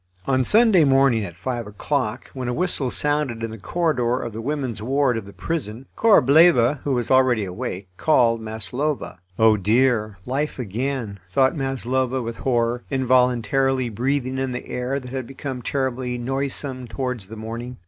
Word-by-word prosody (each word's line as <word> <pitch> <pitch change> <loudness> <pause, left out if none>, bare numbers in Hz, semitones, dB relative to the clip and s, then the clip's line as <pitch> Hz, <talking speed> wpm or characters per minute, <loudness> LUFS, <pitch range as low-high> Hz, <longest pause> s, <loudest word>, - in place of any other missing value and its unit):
On 130 -1 +2
Sunday 215 - +5
morning 135 -5 +4
at 85 -4 -7
five 120 +5 -4
o'clock, 105 -1 -3
when 130 -2 -4
a 125 - -1
whistle 175 -7 0
sounded 145 -5 -1
in 115 - -3
the 110 - -9
corridor 125 - 0
of 115 - -5
the 110 - -5
women's 130 -5 -3
ward 135 +2 +1
of 110 -3 -5
the - - -10
prison, 130 -4 -4
Korableva, 150 - +5
who 140 - 0
was 120 -1 -1
already 130 -4 +4
awake, 95 +1 -5
called 120 -7 +3
Maslova. 110 - -3 0.2
"Oh, 110 -1 +5
dear! 110 0 +2
life 140 +4 -2
again," 120 -2 -3
thought 130 - +2
Maslova, 130 -1 -1
with 115 -1 -5
horror, 120 -1 0
involuntarily 130 0 +2
breathing 130 +3 -1
in 130 -1 -2
the 125 - -5
air 125 +3 -2
that 125 -2 -10
had 130 -3 -4
become 135 -1 -6
terribly 130 -1 -2
noisome 135 0 -3
towards 125 -4 -4
the 110 - -9
morning. 115 +3 -6
125 Hz, 160 wpm, -22 LUFS, 115-135 Hz, 0.2 s, Sunday